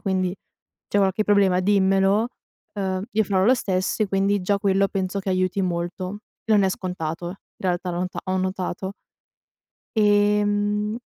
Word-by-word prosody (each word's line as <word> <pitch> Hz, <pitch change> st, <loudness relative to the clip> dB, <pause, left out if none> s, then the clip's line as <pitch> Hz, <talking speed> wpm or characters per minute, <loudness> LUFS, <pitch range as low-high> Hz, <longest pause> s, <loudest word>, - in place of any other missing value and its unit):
quindi, 185 Hz, -2 st, 0 dB, 0.6 s
c'è -, -, +1 dB
qualche 195 Hz, +1 st, +2 dB
problema 200 Hz, -3 st, +3 dB
dimmelo, 195 Hz, +2 st, +3 dB, 0.5 s
uhm, 190 Hz, -1 st, -2 dB
io 220 Hz, +1 st, +2 dB
farò 190 Hz, -2 st, +1 dB
lo 255 Hz, -, +6 dB
stesso" 190 Hz, -4 st, -1 dB
e -, -, -2 dB
quindi, 195 Hz, +1 st, +1 dB
già 200 Hz, +2 st, +1 dB
quello 195 Hz, 0 st, +2 dB
penso 195 Hz, 0 st, -2 dB
che 195 Hz, -, -4 dB
aiuti 185 Hz, +1 st, +1 dB
molto. 180 Hz, +2 st, -3 dB, 0.3 s
Non 210 Hz, -3 st, +4 dB
è 190 Hz, -, +3 dB
scontato, 175 Hz, -3 st, -4 dB
in 180 Hz, -, -6 dB, 0.3 s
realtà 180 Hz, -1 st, -1 dB
l'ho 175 Hz, +1 st, -1 dB
ta -, -, -6 dB
ho 185 Hz, 0 st, 0 dB
notato. 185 Hz, 0 st, -3 dB, 1.0 s
Ehm 210 Hz, +1 st, +2 dB
195 Hz, 150 wpm, -23 LUFS, 185-205 Hz, 1.0 s, lo